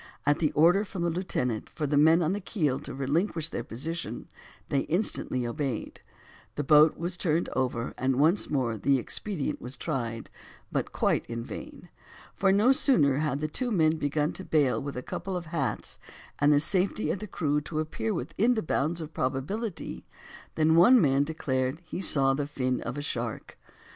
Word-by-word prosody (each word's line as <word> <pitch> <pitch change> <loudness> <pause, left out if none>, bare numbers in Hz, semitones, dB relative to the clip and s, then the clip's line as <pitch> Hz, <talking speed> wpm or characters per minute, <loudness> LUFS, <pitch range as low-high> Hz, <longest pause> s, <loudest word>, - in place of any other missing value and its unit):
At 145 +2 +3
the 155 -4 +1
order 175 +6 +5
from 190 -3 -5
the 170 - +1
lieutenant 130 - -2
for 155 - -4
the 145 0 0
men 160 +4 +5
on 165 +4 +1
the 205 - -2
keel 155 - -1
to - - -7
relinquish 160 +4 -1
their 120 - -4
position 155 +10 -5 0.4
they 140 - +2
instantly 155 - 0
obeyed, 120 0 -4 0.5
the 145 - -2
boat 150 +2 +6
was 175 +2 -2
turned 170 -1 0
over 125 -2 -2
and 130 +1 +1
once 160 +9 +3
more 120 -6 -1
the 140 +4 +3
expedient 155 - -3
was 125 +3 -7
tried 115 -7 -4 0.4
but - - -2
quite - - +1
in 115 0 -4
vain; - - -9 0.4
for 195 -1 +2
no 210 +6 +5
sooner 155 - +4
had 150 -2 -1
the 155 - 0
two 245 - -2
men 160 -7 +2
begun 150 0 0
to 190 - -7
bail 145 -7 +2
with 140 -2 -5
a 125 - -4
couple 190 -1 -4
of 175 - -6
hats, 155 -5 -3 0.4
and 145 +1 +4
the 145 - +5
safety 185 +6 0
of - - -3
the 215 - -6
crew 150 -5 0
to 155 +1 -4
appear 130 -8 -2
within 200 - 0
the 220 - -1
bounds 160 +2 -1
of 155 0 -8
probability, 160 - -3 0.5
than 160 0 +3
one 240 +10 +7
man 140 -5 +3
declared 135 -2 -2
he 160 - -5
saw 135 -6 +4
the 140 +1 -2
fin 130 -3 -1
of 135 - -5
a 145 - -4
shark. 120 -5 -4
150 Hz, 185 wpm, -28 LUFS, 135-170 Hz, 0.5 s, one